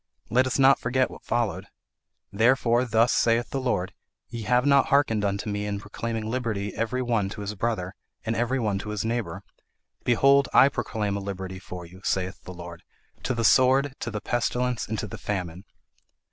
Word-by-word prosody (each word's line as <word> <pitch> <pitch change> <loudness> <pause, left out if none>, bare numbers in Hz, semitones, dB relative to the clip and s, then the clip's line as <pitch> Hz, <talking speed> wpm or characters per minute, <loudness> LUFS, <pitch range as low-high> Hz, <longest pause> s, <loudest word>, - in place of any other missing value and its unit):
Let 130 +3 +3
us 130 - -1
not 135 0 +6
forget 130 0 0
what - - -12
followed. 120 -4 -1 0.7
'Therefore, 120 +2 +3
thus 115 0 +3
saith 115 +1 +2
the 135 - -2
Lord 100 -7 -1 0.4
ye 115 - -6
have 125 +4 +3
not 140 -1 +4
harkened 140 -8 +2
unto 100 +1 -1
me 105 0 -2
in 100 -1 -3
proclaiming 110 +2 -4
liberty 110 -4 -2
every 125 +3 -1
one 115 -5 0
to 105 - -7
his 100 +1 -4
brother, 100 -3 -2 0.3
and 115 - -1
every 120 +3 0
one 105 -4 0
to 105 - -6
his 105 0 -3
neighbour 115 0 -3 0.6
behold 135 +3 +4
I 135 - +8
proclaim 110 -5 -2
a - - -4
liberty 95 -1 -6
for 90 -2 -8
you, 90 +3 -14
saith 95 +1 -2
the - - -7
Lord, 85 -1 -9 0.4
to 130 - -2
the 115 -1 0
sword, 130 +4 +4
to 120 - -4
the 105 -2 -4
pestilence, 125 +1 -1
and 110 - -3
to - - -3
the 105 - -8
famine.' 90 -2 -4
115 Hz, 190 wpm, -26 LUFS, 100-125 Hz, 0.7 s, I